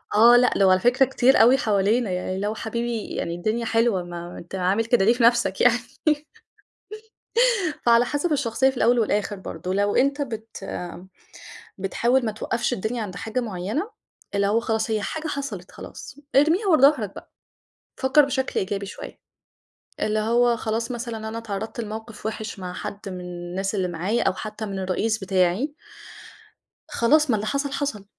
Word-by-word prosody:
آه 235 Hz, +3 st, +8 dB
لأ، 245 Hz, -5 st, +3 dB
وعلى 185 Hz, 0 st, +5 dB
فكرة 250 Hz, +6 st, +4 dB
كتير 265 Hz, -1 st, +4 dB
أوي 250 Hz, +4 st, +6 dB
حوالينا، 210 Hz, +1 st, +1 dB
يعني 180 Hz, +1 st, -2 dB
اللي 200 Hz, +2 st, -2 dB
هو 215 Hz, -, -2 dB
حبيبي 235 Hz, 0 st, -3 dB
يعني 170 Hz, -, -3 dB
الدنيا 215 Hz, +6 st, -1 dB
حلوة، 225 Hz, -4 st, +1 dB
ما 175 Hz, 0 st, -8 dB
أنت 175 Hz, +3 st, -9 dB
عامل 190 Hz, +4 st, +1 dB
كده 230 Hz, -4 st, +3 dB
ليه 230 Hz, -, +5 dB
في 240 Hz, -, -1 dB
نَفْسَك 230 Hz, -5 st, +3 dB
يعني؟ 245 Hz, 0 st, +5 dB, 2.1 s
فعلى 235 Hz, 0 st, +5 dB
حَسَب 295 Hz, +6 st, -1 dB
الشخصية 265 Hz, -1 st, +2 dB
في 265 Hz, -, -6 dB
الأول 240 Hz, +1 st, +3 dB
والآخر 210 Hz, -1 st, 0 dB
برضه، 185 Hz, -1 st, -5 dB
لو 205 Hz, +1 st, +1 dB
أنت 280 Hz, +2 st, +2 dB
بت 225 Hz, -6 st, -6 dB, 1.1 s
بتحاول 235 Hz, +6 st, +1 dB
ما 220 Hz, -, 0 dB
توقّفش 230 Hz, +3 st, -2 dB
الدنيا 230 Hz, +2 st, -3 dB
عند 185 Hz, -3 st, -7 dB
حاجة 220 Hz, +6 st, -3 dB
معيّنة، 215 Hz, -, -3 dB, 0.5 s
اللي 200 Hz, 0 st, +2 dB
هو 215 Hz, +3 st, +2 dB
خلاص 225 Hz, -1 st, -1 dB
هي 215 Hz, -1 st, 0 dB
حاجة 315 Hz, +9 st, -4 dB
حَصَلِت 275 Hz, -, -5 dB
خلاص، -, -, -10 dB, 0.2 s
ارميها 320 Hz, +9 st, +4 dB
ورا 315 Hz, -7 st, +4 dB
ضهرك 260 Hz, -9 st, +4 dB
بقى، -, -, -12 dB, 0.7 s
فكّر 265 Hz, +2 st, +4 dB
بشكل 265 Hz, -1 st, -1 dB
إيجابي 200 Hz, +1 st, -3 dB
شوية، 195 Hz, -, -9 dB, 0.8 s
اللي 215 Hz, 0 st, 0 dB
هو 235 Hz, +2 st, +3 dB
خلاص 225 Hz, +1 st, -2 dB
مثلًا 230 Hz, -2 st, -5 dB
أنا 225 Hz, +1 st, -5 dB
اتعرّضت 220 Hz, +1 st, -5 dB
لموقف 220 Hz, 0 st, -7 dB
وحش 220 Hz, -1 st, -5 dB
مع 180 Hz, -1 st, -6 dB
حد 200 Hz, -, -6 dB
من 185 Hz, -1 st, -6 dB
الناس 180 Hz, +3 st, -4 dB
اللي 190 Hz, -3 st, 0 dB
معايا، 180 Hz, +7 st, -1 dB
أو -, -, +2 dB
حتى 215 Hz, +2 st, -6 dB
من 195 Hz, -1 st, -5 dB
الرئيس 200 Hz, +4 st, 0 dB
بتاعي 190 Hz, -, 0 dB, 1.2 s
خلاص 300 Hz, +5 st, +3 dB
ما 230 Hz, -, +4 dB
اللي 215 Hz, +1 st, -3 dB
حَصَل، 280 Hz, +2 st, -1 dB
حَصَل، 275 Hz, -8 st, -3 dB
220 Hz, 165 wpm, -24 LUFS, 195-245 Hz, 2.1 s, آه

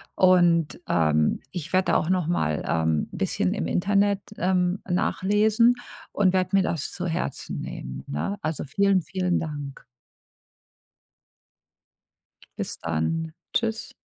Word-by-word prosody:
Und, 175 Hz, -3 st, +4 dB
ähm, 75 Hz, -2 st, +2 dB
ich 170 Hz, -2 st, -6 dB
werde 185 Hz, 0 st, +2 dB
da -, -, +4 dB
auch 160 Hz, -, -1 dB
nochmal, 170 Hz, -, 0 dB
ähm, 80 Hz, -1 st, +1 dB
bisschen -, -, -1 dB
im 80 Hz, -, -2 dB
Internet, 200 Hz, -, +2 dB, 0.2 s
ähm, 180 Hz, +1 st, +1 dB
nachlesen 210 Hz, +6 st, +3 dB, 0.4 s
und 190 Hz, -2 st, +2 dB
werde 185 Hz, +1 st, +1 dB
mir 195 Hz, -, +4 dB
das 165 Hz, -5 st, -2 dB
zu 180 Hz, -, -5 dB
Herzen 165 Hz, -5 st, -3 dB
nehmen, 65 Hz, +1 st, -7 dB
ne? 195 Hz, -, -3 dB
Also 155 Hz, -1 st, -2 dB
vielen, 195 Hz, +6 st, +2 dB
vielen 180 Hz, 0 st, -1 dB
Dank. 145 Hz, -3 st, -6 dB, 2.7 s
Bis -, -, -4 dB
dann. 85 Hz, -, -2 dB, 0.2 s
Tschüss. 225 Hz, -1 st, -1 dB
175 Hz, 120 wpm, -25 LUFS, 145-190 Hz, 2.7 s, Und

